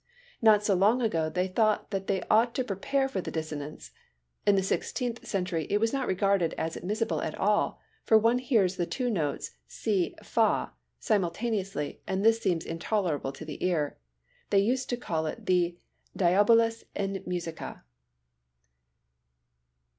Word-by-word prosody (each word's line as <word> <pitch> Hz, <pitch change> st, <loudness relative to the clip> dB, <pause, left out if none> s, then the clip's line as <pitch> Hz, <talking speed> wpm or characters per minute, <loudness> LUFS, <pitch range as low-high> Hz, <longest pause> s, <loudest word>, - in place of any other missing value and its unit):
Not 215 Hz, -2 st, +6 dB
so 205 Hz, -, +3 dB
long 205 Hz, +7 st, +4 dB
ago 165 Hz, -10 st, 0 dB
they 180 Hz, +4 st, 0 dB
thought 215 Hz, +2 st, +1 dB
that 195 Hz, -1 st, -3 dB
they 190 Hz, -2 st, 0 dB
ought 230 Hz, +2 st, +3 dB
to 260 Hz, -, +1 dB
prepare 255 Hz, +6 st, 0 dB
for 200 Hz, -8 st, -3 dB
the -, -, -5 dB
dissonance. 150 Hz, -, -5 dB, 0.6 s
In 205 Hz, -, +6 dB
the 190 Hz, -, +2 dB
Sixteenth 240 Hz, +4 st, -2 dB
Century 180 Hz, -5 st, -1 dB
it 205 Hz, -, +3 dB
was 225 Hz, +3 st, +1 dB
not 270 Hz, -2 st, -1 dB
regarded 190 Hz, -3 st, +1 dB
as 165 Hz, 0 st, -2 dB
admissible 215 Hz, +5 st, -1 dB
at -, -, -3 dB
all, -, -, +1 dB, 0.2 s
for 220 Hz, -, +5 dB
one 230 Hz, +3 st, +3 dB
hears 220 Hz, -8 st, +2 dB
the 175 Hz, -, -1 dB
two 250 Hz, -2 st, -1 dB
notes 155 Hz, -9 st, -2 dB, 0.2 s
si 195 Hz, -, -1 dB
and -, -, -16 dB
fa -, -, +1 dB, 0.3 s
simultaneously 195 Hz, -, -1 dB
and 190 Hz, +2 st, -1 dB
this 225 Hz, 0 st, +5 dB
seems 170 Hz, -6 st, 0 dB
intolerable 165 Hz, -4 st, -1 dB
to 140 Hz, +3 st, -10 dB
the 150 Hz, -, -7 dB
ear. 155 Hz, -, 0 dB, 0.5 s
They 200 Hz, -, +3 dB
used 250 Hz, +5 st, 0 dB
to 245 Hz, -, -1 dB
call 160 Hz, -8 st, -2 dB
it -, -, -6 dB
the 175 Hz, -1 st, +2 dB, 0.4 s
Diabolus 225 Hz, +5 st, +4 dB
in 195 Hz, -1 st, -2 dB
musica. 170 Hz, -, -5 dB
195 Hz, 155 wpm, -28 LUFS, 170-225 Hz, 0.6 s, Not